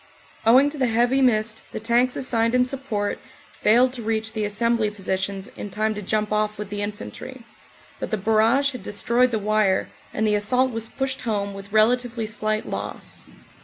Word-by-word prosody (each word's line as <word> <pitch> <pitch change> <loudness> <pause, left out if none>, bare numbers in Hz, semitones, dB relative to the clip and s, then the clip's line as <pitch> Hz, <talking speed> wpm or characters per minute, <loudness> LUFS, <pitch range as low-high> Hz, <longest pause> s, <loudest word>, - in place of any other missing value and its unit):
Owing 265 +5 +6
to 300 - -8
the 255 - +2
heavy 240 +4 +2
mist 220 -3 +1
the - - -3
tanks 240 +3 +2
assigned 230 -2 +1
in 250 0 +4
support 250 -6 -3 0.3
failed 245 +4 +3
to 250 - -6
reach 220 0 -2
the 215 -2 -2
assembly 225 +1 +1
positions 195 -1 -3
in 205 - -6
time 215 +2 -1
to 210 - -6
jump 215 +2 -1
off 210 0 0
with 210 -1 -6
the 205 0 -3
infantry, 230 +4 -7 0.5
but - - -4
the 215 - 0
barrage 225 +7 +3
had 255 - -8
destroyed 235 +5 +1
the 230 - -1
wire 210 -2 +1 0.2
and 220 - -1
the 210 - +2
assault 250 +5 +2
was 225 -1 -3
pushed 265 -1 -3
home 200 -4 -2
with 195 +1 -10
relatively 230 +1 +2
slight 215 0 -2
loss. - - -6
220 Hz, 180 wpm, -23 LUFS, 210-245 Hz, 0.5 s, Owing